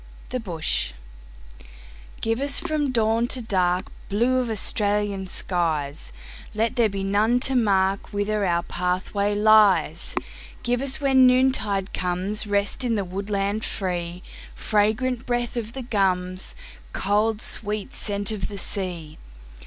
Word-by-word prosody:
The 255 - -2
Bush 165 - -2 1.3
GIVE 225 +3 0
us 280 0 +1
from 310 -4 -1
dawn 230 0 +2
to 255 - -1
darkBlue 205 +4 0
of 245 - -3
Australian 205 -2 +1
skies, 155 - -1 0.4
Let 225 +3 0
there 235 -4 +3
be 195 -1 -4
none 210 +5 +2
to 270 - +3
markWhither 205 -1 +1
our 170 0 +1
pathway 185 +3 -1
lies. 205 -6 +4 0.5
Give 245 0 0
us 270 -1 0
when 265 -2 +5
noontide 250 -7 +2
comesRest 200 +5 0
in 235 -2 +1
the 200 -2 -1
woodland 200 +3 -2
free—Fragrant 205 +6 -2
breath 240 -1 -1
of 230 -1 -4
the 265 - -5
gums, 185 -5 -1 0.4
Cold, 210 +2 +1
sweet 215 +3 -3
scent 205 -3 -2
of 210 -4 -3
the 200 - -8
sea. 175 -6 -2
205 Hz, 120 wpm, -24 LUFS, 190-235 Hz, 1.3 s, when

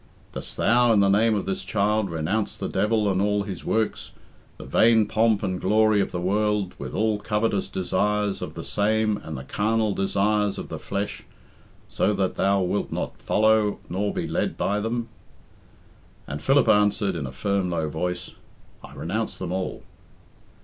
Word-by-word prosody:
"Dost - - -8
thou, 120 0 +4
in 105 - +4
the 100 -1 +4
name 110 +3 +3
of 100 - -2
this 95 0 -3
child, 105 +1 0
renounce 85 +7 -2
the - - -3
devil 105 0 +1
and 95 -1 +1
all 105 0 +1
his 95 -4 -7
works, 110 -1 -1 0.4
the - - -9
vain 110 -1 +4
pomp 110 -1 +2
and 95 -2 -2
glory 110 +1 +3
of - - -2
the 90 - -3
world, 105 +1 0
with - - -6
all 110 -1 +1
covetous 105 -1 0
desires 105 +2 -1
of - - -6
'the - - -6
same, 110 0 +1
and 80 -7 -7
the 65 - -7
carnal 110 +6 0
desires 100 +1 +1
of - - -6
the - - -5
flesh, 100 +1 -4 0.7
so 105 - +1
that 95 -2 0
thou 100 0 +2
wilt 90 +3 -1
not - - -4
follow 110 -1 +2
nor 100 +3 -1
be - - -3
led - - -1
by 105 +1 0
them?" 115 +2 -2 1.2
And 70 +1 -6
Philip 135 0 +3
answered, 105 -1 +3
in 75 -5 -3
a - - -7
firm, 95 +7 -1
low 80 -3 -1
voice, 90 +4 -3 0.5
"I - - -12
renounce 110 +6 -3
them 90 -2 -4
all." 95 0 -3
105 Hz, 175 wpm, -25 LUFS, 95-110 Hz, 1.2 s, thou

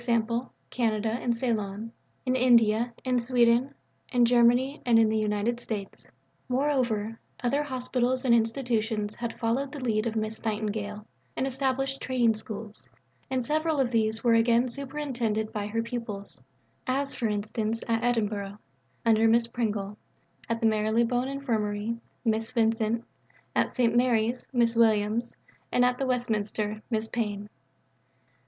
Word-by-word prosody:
_ 235 +1 +1 0.2
Canada 225 -2 0
and 235 0 -1
Ceylon), 220 -2 -2 0.3
in 255 0 +1
India, 235 -2 +4
in 250 -1 +2
Sweden, 240 +2 +3 0.4
in 245 -2 +4
Germany, 245 +4 +3
and 235 -2 +4
in 225 -1 +5
the 220 - +1
United 215 +3 0
States. 210 -5 -5 0.4
Moreover, 250 -5 0 0.2
other 275 +4 +2
Hospitals 255 -2 -1
and 240 - +5
Institutions 225 -3 0
had 235 0 -5
followed 250 +4 0
the 295 - -6
lead 225 -3 0
of 225 - -3
Miss 220 0 -3
Nightingale 210 -1 -3 0.3
and 260 - 0
established 270 0 -1
Training 245 -3 +2
Schools, 215 -1 -7 0.4
and 255 -2 -1
several 310 +1 +1
of 255 -3 +2
these 220 -1 +1
were 235 -2 +4
again 235 +2 +4
superintended 250 -5 -2
by 205 -1 -2
her 230 +2 -1
pupils; 230 - -6 0.5
as, 275 +2 0
for 235 - -1
instance, 215 +2 -2
at 230 0 0
Edinburgh 210 -4 -1 0.5
(under 225 0 +5
Miss 230 +1 +4
Pringle), 210 -3 -3 0.5
at 230 0 0
the - - +2
Marylebone 230 +3 +2
Infirmary 225 -5 -1 0.3
(Miss 225 0 +1
Vincent), 225 0 +1 0.5
at - - +1
St. 235 -2 +2
Mary's 240 0 +2
(Miss 235 -2 +2
Williams), 225 0 +2 0.4
and 245 - +4
at 250 0 +1
the 270 - 0
Westminster 215 -3 -1
(Miss 220 -2 -1
Pyne). 210 -3 -3
230 Hz, 140 wpm, -28 LUFS, 215-250 Hz, 0.5 s, in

